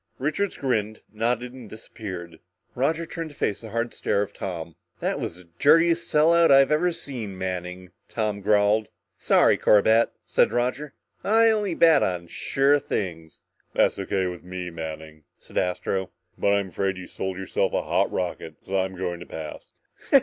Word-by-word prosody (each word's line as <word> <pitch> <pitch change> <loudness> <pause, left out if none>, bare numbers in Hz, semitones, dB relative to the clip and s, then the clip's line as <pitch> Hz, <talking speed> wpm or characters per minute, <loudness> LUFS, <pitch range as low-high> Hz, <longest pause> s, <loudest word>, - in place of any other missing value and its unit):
Richards 155 +9 -1
grinned, 110 -5 -1
nodded 120 +3 -1
and 125 -5 -11
disappeared. 95 -6 -8 0.3
Roger 160 +6 0
turned 165 -1 -6
to 145 - -15
face 100 - -1
the 110 - -9
hard 115 +2 -2
stare 100 - 0
of 100 0 -8
Tom. 85 -3 -6 0.2
"That - - -1
was - - -4
the 90 - -13 0.2
dirtiest 165 +2 +4
sellout 165 +2 +5
I've 135 +1 +6
ever 170 +4 +3
heard, 130 -9 -6
Manning," 90 -1 -5 0.2
Tom 105 -2 -2
growled. 105 +1 +3 0.3
"Sorry, - - +4
Corbett," 110 +2 +5 0.2
said - - +3
Roger. 125 +4 -1 0.3
"I 225 +2 +5
only 205 -5 0
bet 165 -1 +6
on 90 -2 -1
sure 140 +2 +2
things." 85 - -5 0.3
"That's - - +2
O.K. 95 -1 -1
with 90 -1 -5
me, 90 -1 -6
Manning," 80 -1 -7
said - - -4
Astro, 95 +1 -1 0.3
"but 100 - +1
I'm 100 -1 +1
afraid 95 0 -1
you 95 - -7
sold 95 0 -5
yourself 95 -1 -1
a - - 0
hot - - +1
rocket, 85 -3 -4
because 95 - -10
I'm 95 -1 0
going 90 -2 -3
to 90 - -10
pass!" 80 -1 -8
105 Hz, 165 wpm, -25 LUFS, 90-135 Hz, 0.3 s, I've